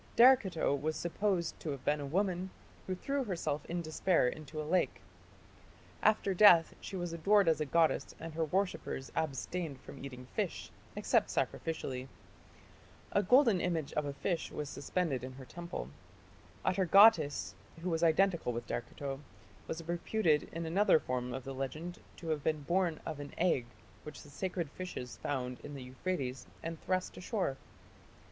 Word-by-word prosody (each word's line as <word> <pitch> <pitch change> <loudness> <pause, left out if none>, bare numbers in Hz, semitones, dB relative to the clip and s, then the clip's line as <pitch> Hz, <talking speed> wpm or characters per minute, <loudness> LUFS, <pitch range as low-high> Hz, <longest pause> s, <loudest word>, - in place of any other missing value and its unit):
" - - -25
Derceto 230 - +6
was 155 +3 -2
supposed 175 -1 -1
to 160 - -5
have 140 -3 -5
been 150 0 +2
a 145 - -4
woman 185 +3 0 0.4
who 185 - -1
threw 275 +8 -1
herself 160 - -2
in 170 0 -2
despair 160 -2 +2
into 155 +3 -5
a 155 - -3
lake. 180 +4 +1 1.0
After 210 -2 +3
death 180 -4 +7
she 195 - -6
was 175 -2 -3
adored 200 +4 +4
as 160 -1 +3
a 150 - 0
goddess 165 +2 +2
and 165 -1 -7
her 160 0 0
worshippers 180 -6 -2
abstained 160 0 -2
from 135 - -11
eating 125 -2 -7
fish, - - -2 0.2
except - - +2
sacrificially. 130 -5 -2 1.0
A 200 - +3
golden 230 -2 +5
image 165 -5 -1
of 150 - 0
a 140 - -3
fish 170 +4 -2
was 150 -2 -4
suspended 140 -2 -1
in 130 0 -6
her 130 0 -10
temple. 170 - -6 0.8
Atargatis, 185 -4 +5 0.3
who 180 - -1
was 165 0 0
identical 170 -3 +3
with 120 - -4
Derceto, 135 +3 -4 0.5
was 160 0 -5
reputed 170 -2 +1
in 165 0 -4
another 185 +1 +4
form 125 -2 -3
of 130 +1 -4
the 135 - -5
legend 155 +6 -5 0.2
to 165 - -7
have 155 -3 -1
been 155 -2 0
born 175 0 +1
of 150 - -4
an 145 0 -8
egg 165 -9 +2 0.3
which 150 -1 -9
the 145 - -14
sacred 175 -1 -3
fishes 180 -10 -6
found 125 -3 -2
in 145 - -8
the 135 - -7
Euphrates 130 0 -3 0.2
and 165 -1 -5
thrust 185 0 -1
ashore 185 - -1
(p. 135 - -18
160 Hz, 165 wpm, -33 LUFS, 140-185 Hz, 1.0 s, death